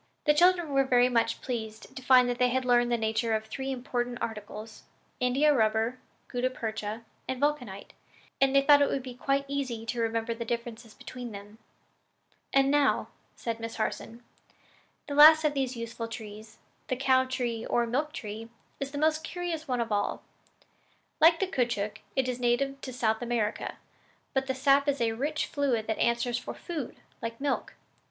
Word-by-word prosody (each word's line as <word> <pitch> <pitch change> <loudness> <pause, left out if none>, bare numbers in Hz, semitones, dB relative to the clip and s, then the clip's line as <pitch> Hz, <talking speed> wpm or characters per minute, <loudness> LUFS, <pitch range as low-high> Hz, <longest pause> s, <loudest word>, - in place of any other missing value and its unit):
The 300 - +5
children 350 0 +4
were 275 0 +4
very 250 -1 +4
much 235 -2 +1
pleased 220 -3 -5
to - - -6
find 255 -1 +6
that 245 0 -2
they 250 0 +4
had 260 +1 0
learned 240 -1 +3
the 235 - +3
nature 220 0 0
of 220 0 -3
three 265 +5 -4
important 245 -1 -3
articles 215 0 -6 0.4
India 270 +4 +3
rubber, 225 +1 +1 0.3
gutta 250 +1 -1
percha 220 -2 -5 0.2
and 260 -1 -3
vulcanite 255 -9 -2 0.5
and 270 0 +4
they 275 - +6
thought 285 0 +7
it 285 - +4
would 270 - -2
be 255 -1 -7
quite 275 +3 0
easy 260 -5 -3
to 230 +1 -2
remember 230 0 -1
the 230 +1 -5
differences 230 -1 -5
between 245 -3 -8
them. 205 +2 -11 0.9
"And 275 0 +4
now," 290 -1 +2 0.3
said 230 -1 -4
Miss 230 0 -5
Harson, 230 +1 -4 0.8
"the 285 - -4
last 310 +2 +9
of 300 -1 +2
these 265 -3 -2
useful 230 0 -5
trees 220 -1 -9 0.3
the 255 - 0
cow 260 0 +3
tree, 240 -3 -2
or 240 - +2
milk 285 +6 -1
tree 220 -2 -7 0.3
is 275 - -3
the 285 - -6
most 310 +1 +2
curious 340 -2 -4
one 250 -2 0
of 230 -1 -3
all. 205 -1 -1 1.0
Like 330 +1 +6
the 385 - +2
caoutchouc, 235 - -1 0.2
it 265 -1 +1
is 250 -1 -2
a - - -10
native 270 +3 +1
of 255 - -6
South 220 -2 +1
America; 230 -3 -2 0.6
but 265 0 0
the 265 - -1
sap 275 +2 +3
is 280 -1 +1
a 230 -1 +1
rich 290 +7 -1
fluid 260 -6 0
that 220 - -2
answers 235 +1 +1
for - - -7
food, 320 -8 -5 0.3
like 230 0 -5
milk. 280 0 -2
245 Hz, 180 wpm, -29 LUFS, 230-275 Hz, 1.0 s, last